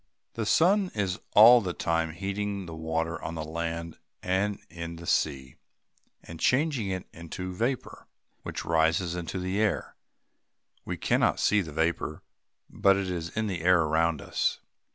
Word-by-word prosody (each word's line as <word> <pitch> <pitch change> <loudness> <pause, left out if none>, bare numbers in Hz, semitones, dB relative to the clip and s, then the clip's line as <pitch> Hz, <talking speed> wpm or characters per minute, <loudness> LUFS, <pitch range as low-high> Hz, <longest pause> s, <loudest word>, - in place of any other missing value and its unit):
The 110 -2 -3
sun 185 - +4
is 95 -3 -1 0.2
all 115 +3 +9
the 90 -4 -3
time 80 -1 0
heating 100 +2 -3
the 85 - -8
water 80 +1 -2
on 85 - -5
the 80 - -4
land 85 +1 -4 0.2
and 95 +2 0
in 85 0 -7
the 85 +1 -10
sea, 65 -5 -1 0.7
and 85 -1 -10
changing 130 - +1
it 95 -1 -3
into 90 +2 -6
vapor, 120 +7 -3 0.3
which - - -6
rises 80 +2 +2
in 90 -1 -4
the 95 +4 -2
air. 105 -4 -1 0.9
We - - -4
cannot - - +2
see 105 -1 +3
the 80 -4 -7
vapor; 80 0 -1 0.4
but 100 0 +3
it 95 -2 -2
is 85 -2 -3
in 110 - +1
the 95 -5 -3
air 90 0 +5
around 80 0 +1
us. - - -1
90 Hz, 155 wpm, -28 LUFS, 80-100 Hz, 0.9 s, all